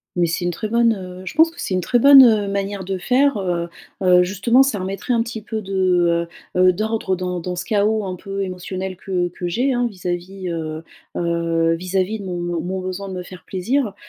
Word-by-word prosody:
Mais 175 -1 +2
c'est 170 +2 -2
une 175 - +1
très 215 +5 -4
bonne, 230 +1 +3
heu 185 -1 -8
je - - -5
pense 325 +2 +5
que 335 - -16
c'est - - -3
une 185 - 0
très 240 +8 +2
bonne, 275 +1 +9
heu, 215 -4 +4
manière 200 0 -3
de 190 +1 -3
faire, 255 +7 +2
heu 175 -3 -2 0.3
heu, 180 -1 +5
justement 210 +8 +3
ça 260 -7 -1
remettrait 195 +5 -3
un 230 - +2
petit 230 -1 -5
peu 220 0 -4
de, 180 -3 +1 0.3
heu - - +1
heu, 185 0 +6
d'ordre 215 -1 -1
dans 180 0 -3
dans 180 +1 -4
ce 175 - -4
chaos 215 +1 +1
un 185 -1 -4
peu 195 +2 -5
émotionnel 185 0 -5
que 180 -1 -1
que 175 +1 -5
j'ai, 250 +10 0
hein, 245 0 +1
vis-à-vis, 185 -1 -5
heu 160 -1 -4 0.3
heu, 170 -1 +1
vis-à-vis 185 +4 -1
de 200 - -7
mon 180 -1 -4 0.2
de - - -4
mon 185 +1 -3
besoin 185 +1 -5
de - - -6
me 180 - -4
faire 180 0 -12
plaisir, 215 +4 -1
190 Hz, 225 wpm, -20 LUFS, 180-215 Hz, 0.3 s, bonne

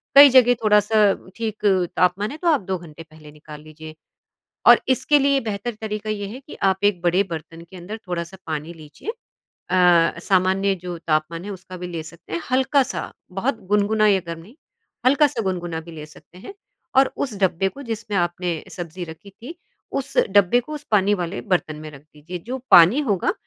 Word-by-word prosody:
कई 280 0 +11
जगह 250 -2 +6
थोड़ा-सा 210 -1 +4 0.2
ठीक 220 -2 -4 0.3
तापमान 180 +4 +1
है 300 - -7
तो 345 - -3
आप 295 -7 +3
2 190 0 -3
घंटे 165 -2 -12
पहले 155 -1 -16
निकाल 150 0 -12
लीजिए 155 0 -12 0.7
और - - +9
इसके 280 +3 +3
लिए 275 0 +3
बेहतर 220 +1 -4
तरीका 215 0 -4
ये 205 -1 -3
है 230 +6 -8
कि - - -9
आप 190 0 +1
एक 195 -4 +2
बड़े 175 +2 +2
बर्तन 165 +1 -7
के 190 - -11
अंदर 190 +6 -7
थोड़ा-सा 175 +1 -4
पानी 155 +2 -4
लीजिए 155 - -11 0.4
अ, 175 -2 +2
सामान्य 190 +2 +2
जो 175 -1 -5
तापमान 165 +1 -1
है 205 - -5
उसका 185 -1 -9
भी 180 0 -6
ले 170 -2 -5
सकते 165 0 -12
हैं, 170 - -2
हल्का-सा 265 +1 +1 0.2
बहुत 225 +7 -2
गुनगुना 210 +1 +3
या 195 -2 +4
गर्म 165 0 -5
नहीं 210 +10 -17 0.5
हल्का-सा 280 -3 +3
गुनगुना 175 -4 -3
भी 170 +1 -12
ले 155 -2 -8
सकते 155 +3 -18
हैं 295 - -10 0.4
और 265 0 +4
उस 255 -7 -3
डब्बे 190 0 +1
को 275 - -12
जिसमें 225 -3 -4
आपने 175 -1 -2
सब्ज़ी 175 0 -7
रखी 160 +4 -12
थी 240 - -11 0.4
उस 265 - -8
डब्बे 205 +4 +4
को 305 +5 -9
उस 295 - -9
पानी 205 -1 +3
वाले 180 0 -4
बर्तन 155 -3 -1
में 155 - -8
रख 140 -2 -13
दीजिए 155 +4 -10
जो 260 +1 -3
पानी 180 - +8
होगा 195 -3 +1
190 Hz, 190 wpm, -22 LUFS, 170-220 Hz, 0.7 s, कई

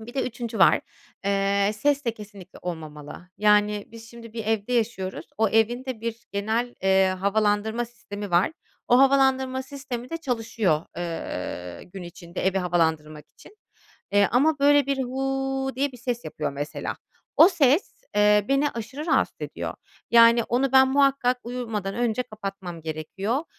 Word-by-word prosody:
Bir 235 +3 -11
de 270 - 0
3'üncü 235 -2 -5
var. - - +6 0.4
Eee, 200 0 +2
ses 285 +5 +1
de 235 -2 -1
kesinlikle 200 -4 -12
olmamalı. 155 0 -7
Yani, 210 0 +3
biz 225 0 -12
şimdi 230 -1 -12
bir 225 -2 -5
evde 220 +1 -1
yaşıyoruz. 220 -5 -1
O 220 -1 +3
evin 225 +4 +1
de 255 -4 -5
bir 230 +1 -5
genel, 220 +4 -1
eee, 190 0 +4
havalandırma 215 +3 +1
sistemi 205 -4 -8
var. 175 - +3 0.4
O 245 - +6
havalandırma 265 -1 +3
sistemi 260 -3 -7
de 330 - -2
çalışıyor, 225 - -1
eee, 90 - -5
gün 185 0 -10
içinde 175 +1 -6
evi 195 0 +2
havalandırmak 160 -4 0
için, 425 - -16 0.6
eee, 205 -1 +4
ama 295 +5 +3
böyle 285 0 +5
bir 275 -1 0
"hu" 270 +1 -2
diye 275 +1 0
bir 250 - -12
ses 240 0 -3
yapıyor - - -4
mesela. 145 +2 -4 0.4
O 330 - +9
ses, 325 - +1
eee, 210 0 +5
beni 275 +2 +2
aşırı 265 +7 -6
rahatsız - - +1
ediyor. - - -5 0.4
Yani, 235 0 +7
onu 255 +3 0
ben 265 0 +7
muhakkak 270 -2 +3
uyumadan 225 -5 -4
önce 240 0 0
kapatmam 195 -7 -7
gerekiyor. 190 - -3
225 Hz, 155 wpm, -25 LUFS, 195-260 Hz, 0.6 s, O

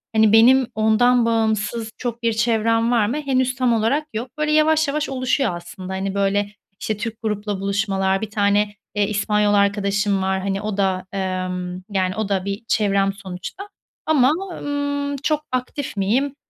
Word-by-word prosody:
Hani, 220 -1 +5
benim 245 +3 +6
ondan 230 +3 +3
bağımsız 225 0 0
çok 240 -1 -5
bir 230 - +2
çevrem 230 0 +1
var 230 -4 +3
mı, 255 +7 -2
henüz 260 -2 0
tam 250 -3 +2
olarak 250 +8 +1
yok. 230 +4 -3
Böyle, 305 0 0
yavaş 310 0 +3
yavaş 300 +2 -1
oluşuyor 255 -5 0
aslında. 185 +2 -8
Hani, 190 0 -2
böyle, 200 +1 +1 0.3
işte, 215 - -2
Türk 230 +1 -5
grupla 210 -2 -2
buluşmalar, 195 -1 0
1 220 - -4
tane, 205 -1 +1 0.2
eee, 205 -1 +2
İspanyol 210 0 +1
arkadaşım 200 0 +1
var. 190 0 0
Hani, 195 +1 -2
o 210 -2 -3
da, 190 -2 0
ımm, 185 -1 -3
yani, 185 -2 0
o 215 -1 -2
da 195 -2 0
bir 200 +2 -4
çevrem 195 -2 +2
sonuçta 195 - -8 0.4
ama 290 -4 +4
o 385 -2 -6
ımm, 285 0 -2
çok 300 +3 0
aktif 255 -1 -3
miyim? 255 +9 +1
215 Hz, 165 wpm, -21 LUFS, 195-255 Hz, 0.4 s, benim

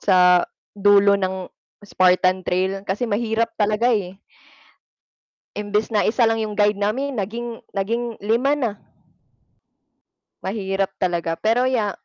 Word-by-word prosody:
sa 180 -2 +5 0.3
dulo 200 0 +4
ng 185 -1 -3 0.3
Spartan 185 -1 +2
Trail 190 +2 0
kasi 195 +6 -1
mahirap 230 +1 -1
talaga, 215 +4 +2
eh. 190 -3 -2 1.4
Imbes 210 +1 -1
na 210 -2 +1
1 230 +1 +3
lang 225 - 0
yung 215 -1 -4
guide 205 -1 +2
namin 250 +6 -2
naging, 230 +3 -5
naging 230 +4 -2
5 235 +7 +1
na. 255 -7 -1 1.7
Mahirap 195 -1 -2
talaga 170 -3 -1
pero 235 +6 +1
ya 220 -6 0
205 Hz, 120 wpm, -21 LUFS, 190-230 Hz, 1.7 s, sa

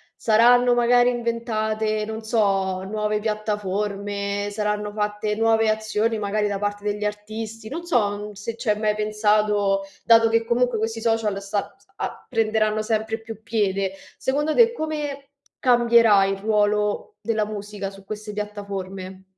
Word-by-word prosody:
saranno 245 +2 +5
magari 245 +1 +4
inventate, 220 -2 -1
non 220 +1 -5
so, 195 -4 +1
nuove 210 +1 -1
piattaforme, 205 -1 -2
saranno 210 0 -2
fatte 210 0 -1
nuove 225 0 +3
azioni 215 +1 0
magari 210 0 0
da 200 -1 -2
parte 205 0 -3
degli 210 0 -2
artisti, 215 +1 -5
non 330 +7 -5
so 210 - 0
se 220 +3 -5
ci 230 - -4
hai 210 0 +2
mai 210 -1 +1
pensato, 210 -2 +2 0.2
dato 225 -1 +6
che 230 0 +2
comunque 245 0 +1
questi 225 +1 -2
social 220 -3 0
sta 200 +1 -3
s - - -29
a - - -5
prenderanno 215 -2 +1
sempre 220 0 -1
più 220 -1 -9
piede. 195 -4 0 0.2
Secondo 295 +4 0
te, 470 -1 +6
come 295 -7 -4 0.3
cambierà 235 -5 +5
il 195 0 -1
ruolo 210 - 0
della 220 -2 0
musica 205 -1 -5
su 195 0 -15
queste 210 +1 -6
piattaforme? 195 -2 -6
215 Hz, 140 wpm, -23 LUFS, 205-225 Hz, 0.3 s, dato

